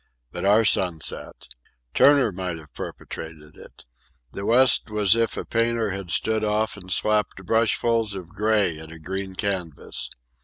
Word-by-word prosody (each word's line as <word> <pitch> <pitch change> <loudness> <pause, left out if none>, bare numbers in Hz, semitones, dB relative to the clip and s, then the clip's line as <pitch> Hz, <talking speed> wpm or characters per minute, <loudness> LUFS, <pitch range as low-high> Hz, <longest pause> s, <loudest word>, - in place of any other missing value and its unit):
But - - -5
our 105 +3 +4
sunset. 90 -6 0 0.5
Turner 140 -6 +5
might 90 -2 -4
have 75 -2 -15
perpetrated 80 -1 -8
it. - - -16 0.5
The 100 - -5
west 125 0 +5
was 105 0 +3
as 115 - +2
if 115 - -1
a - - -4
painter 115 -2 0
had 95 -2 -6
stood 110 +6 0
off 105 +1 0
and 90 -2 -11
slapped 105 -2 0
brushfuls 115 0 +1
of 90 -3 -8
gray 105 -5 +1
at 80 0 -10
a 85 - -10
green 95 +3 -5
canvas. 90 -7 -3
100 Hz, 155 wpm, -24 LUFS, 90-110 Hz, 0.5 s, Turner